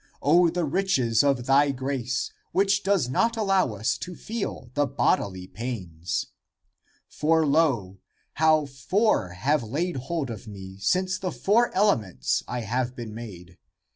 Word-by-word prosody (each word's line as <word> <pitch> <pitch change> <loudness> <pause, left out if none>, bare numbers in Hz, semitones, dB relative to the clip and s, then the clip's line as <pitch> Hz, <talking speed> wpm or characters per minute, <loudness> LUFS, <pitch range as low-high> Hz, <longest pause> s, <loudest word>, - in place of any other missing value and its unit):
O 170 +4 +5
the 175 0 -1
riches 140 - +2
of 135 -4 +1
thy 140 +2 +4
grace, 130 -1 -2 0.2
which 195 +1 +3
does 195 -10 +1
not 230 - +1
allow 195 - +2
us 110 +6 -1
to 180 -1 -6
feel 200 - -5
the 145 0 +1
bodily 95 -8 0
pains! 90 -6 -4 0.8
For, 160 +1 +2
lo, 135 - +1 0.3
how 155 -1 +3
four 140 - +1
have 140 +11 +1
laid 150 +9 -2
hold 135 0 -3
of 115 +1 -8
me, 95 -2 -9
since 185 - +1
of - - -18
the 185 -2 -2
four 230 +5 +2
elements 110 - +1
I 125 0 -3
have 125 +3 -2
been 115 -3 -7
made! 90 -6 -10
135 Hz, 145 wpm, -26 LUFS, 115-175 Hz, 0.8 s, O